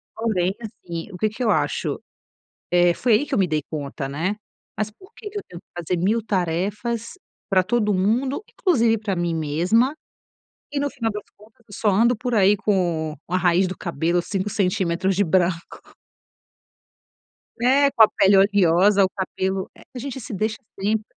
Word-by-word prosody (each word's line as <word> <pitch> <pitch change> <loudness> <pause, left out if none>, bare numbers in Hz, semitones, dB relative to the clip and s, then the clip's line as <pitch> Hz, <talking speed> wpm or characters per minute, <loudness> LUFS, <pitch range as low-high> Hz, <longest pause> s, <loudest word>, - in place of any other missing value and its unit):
Porém, 195 -5 0
assim, 175 -5 -7
o 180 - -8
que 215 +4 +1
que 220 +4 -5
eu 220 - +3
acho - - -1 0.7
eh, 175 0 +4
foi 240 +5 +1
aí 220 +7 +3
que 290 - -7
eu - - +1
me 190 - +3
dei 155 -2 0
conta, 140 -2 -5
né. 165 +9 -2 0.4
"Mas 215 0 -1
por 375 - -19
que 415 - -8
que 415 - -7
eu 410 - -4
tenho 175 - -10
que - - -64
fazer 175 +1 -2
1000 220 +5 +2
tarefas 205 - -2 0.3
para 190 -2 +4
todo 210 +1 +1
mundo, 240 - 0
inclusive 235 - +2
para 205 -3 -3
mim 175 -1 -1
mesma? 175 - +1 0.8
E 290 - -1
no 285 - 0
final 230 -3 -2
das 210 0 -5
contas 220 +3 -21
eu 205 - -11
só 215 - 0
ando 230 +5 +3
por 245 +2 -3
aí 205 -1 +5
com 170 -7 0
a 180 - 0
raiz 180 +1 +3
do 185 - -5
cabelo 170 -1 0
5 195 +2 -2
centímetros 190 -2 0
de 200 - +3
branco". 175 0 -1 1.7
É, 275 +3 +4
com 225 - +6
a - - +8
pele 195 +1 +4
oleosa, 195 0 +4
o - - -2
cabelo 190 0 -3
eh, - - -15
a - - -4
gente 270 +1 -5
se 220 - -8
deixa 215 +3 -1 0.2
sempre. 210 +2 0
200 Hz, 185 wpm, -23 LUFS, 175-225 Hz, 1.7 s, a